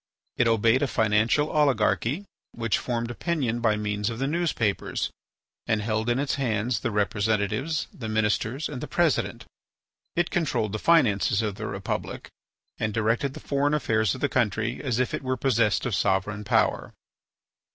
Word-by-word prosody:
It 125 - +3
obeyed 115 +2 +3
a 145 - +2
financial 110 +7 +2
oligarchy 140 - +1 0.3
which 115 -2 0
formed 120 -1 -2
opinion 125 -4 -1
by 115 -2 +2
means 105 0 -1
of 115 - -5
the 135 - -1
newspapers, 145 - -1 0.6
and 110 - +2
held 110 +2 -1
in 120 - +2
its 140 0 0
hands 115 -1 0
the 120 - -2
representatives, 105 - 0
the 115 -4 -6
ministers, 110 +5 0
and 130 -4 -6
the - - -5
president. 170 -5 0 0.7
It 175 0 +1
controlled 125 - 0
the 110 - -3
finances 110 -9 +3
of 105 -2 -1
the 110 +2 -6
republic, 100 0 -4 0.5
and 110 -1 -1
directed 115 +5 0
the - - -7
foreign 145 +1 +1
affairs 110 -6 +1
of 130 - -9
the 145 - +3
country 120 -2 0
as 125 -5 -1
if 125 0 0
it - - -2
were 130 -1 -2
possessed 115 -4 +2
of 120 - -1
sovereign 100 +2 0
power. - - +1
115 Hz, 160 wpm, -26 LUFS, 105-135 Hz, 0.7 s, It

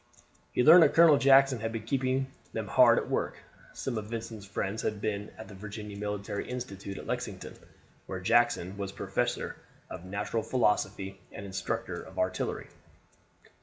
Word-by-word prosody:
He 125 - +2
learned 165 +5 +9
that 155 - +5
Colonel 165 -3 +7
Jackson 135 -2 +5
had 115 +1 -3
been 115 -1 -4
keeping 130 +2 0 0.3
them - - -3
hard - - +6
at - - -1
work. - - -1 0.4
Some 120 -4 -3
of 105 - -8
Vincent's 110 -3 -6
friends 100 +2 -3
had 105 - -2
been 105 -1 -3
at 110 - -9
the 105 - -11
Virginia 105 +1 -8
Military 105 0 -4
Institute 100 -6 -6
at - - -8
Lexington, - - -4 0.5
where 95 - -4
Jackson 110 -2 +2
was 100 -1 -4
professor - - -2 0.3
of 85 - -7
natural 100 +4 -2
philosophy 105 -5 0
and 100 - -8
instructor 95 -1 -3
of - - -13
artillery. 95 0 -2
105 Hz, 160 wpm, -29 LUFS, 100-125 Hz, 0.5 s, learned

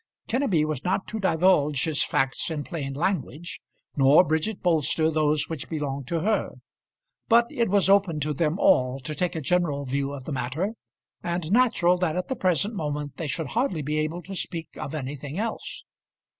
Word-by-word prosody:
Kenneby 225 - +1
was 155 -3 -3
not 190 +2 0
to 220 - -4
divulge 160 -6 +3
his 155 -3 0
facts 135 +4 0
in 155 -3 -3
plain 140 -6 -5
language, 170 -1 -2 0.3
nor 140 +5 +6
Bridget 160 +6 -1
Bolster 160 -2 +2
those 150 -1 +1
which 160 -5 -6
belonged 140 -4 -3
to 165 +1 -1
her; 215 +5 0 0.7
but 235 +1 +5
it 235 -3 0
was 200 0 +3
open 195 -5 +3
to 150 +1 0
them 155 +3 0
all 130 -6 +3
to 140 +4 -5
take 175 +4 -1
a 160 - -2
general 150 -3 0
view 140 +1 -1
of 140 -2 -7
the 155 - -6
matter, 145 - -2 0.5
and 170 -1 -3
natural 215 -7 +4
that 175 -3 0
at 180 - -3
the 260 - -1
present 185 - +1
moment 150 -5 -4
they 165 - -3
should 145 +1 -3
hardly 220 - 0
be 150 +2 -1
able 160 +3 -2
to 195 - -7
speak 165 -2 -4
of 140 - -5
anything 145 +1 -5
else. 225 +2 -4
160 Hz, 185 wpm, -26 LUFS, 145-185 Hz, 0.7 s, nor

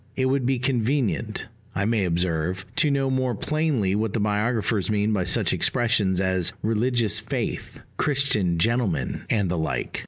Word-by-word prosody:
It 130 - 0
would 130 -1 +1
be 135 0 +2
convenient, 120 - -1 0.3
I 100 +2 0
may 110 -3 +1
observe, 90 +1 -1
to 155 - +4
know 135 -1 +1
more 130 -2 0
plainly 145 -8 0
what 110 0 -1
the 115 - 0
biographers 105 0 0
mean 105 0 +1
by 95 -4 0
such 90 - +2
expressions 110 -6 +1
as 95 -2 0
"religious 115 0 +1
faith," - - -4 0.2
"Christian 130 - +1
gentleman," 100 - 0
and 100 -4 +1
the 85 -1 -1
like. 80 - -2
110 Hz, 155 wpm, -24 LUFS, 95-125 Hz, 0.3 s, to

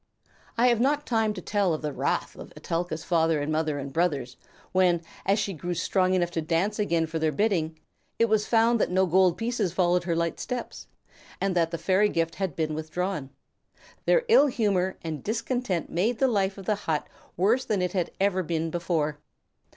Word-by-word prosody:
I 235 - +4
have 235 -2 +2
not 290 +4 +1
time 225 -2 +1
to - - -7
tell 200 -5 +1
of 155 - -8
the 150 -1 -2
wrath - - -1
of - - -11
Etelka's 165 -1 -3
father 165 -2 +2
and 145 +2 -2
mother 155 -1 0
and 140 -1 -6
brothers, 145 -7 0 0.4
when, 180 -2 +3 0.2
as 200 +1 +4
she 205 -2 -1
grew 175 +2 -4
strong 185 +2 +1
enough 175 -1 +1
to 165 - -2
dance 175 +7 0
again 170 -5 +1
for 160 0 -4
their 160 -1 +1
bidding, 165 -3 0 0.4
it 230 - +4
was 215 -1 +1
found 230 0 +3
that - - +1
no 185 +1 +3
gold 180 0 +3
pieces 225 -6 -1
followed 180 -1 +2
her 170 -2 0
light 170 0 -1
steps, 250 -1 -5 0.5
and 195 -2 0
that 165 -2 +2
the 170 - -3
fairy 195 +4 +2
gift 165 -2 -1
had 190 -7 -3
been 155 -1 -1
withdrawn. 155 -1 -3 0.8
Their - - +4
ill 445 -11 +6
humor 200 -7 0
and 155 -4 -5
discontent 230 -4 -2
made 215 +8 +1
the 265 - +3
life 200 -5 0
of 195 - -9
the 215 - +2 0.2
hut 150 -2 0 0.3
worse 220 +9 +3
than 210 -7 0
ever 180 +1 0
it 175 - -1
had 185 -4 +1
been 165 -1 -1
before. 160 -3 -1
180 Hz, 195 wpm, -26 LUFS, 165-210 Hz, 0.8 s, ill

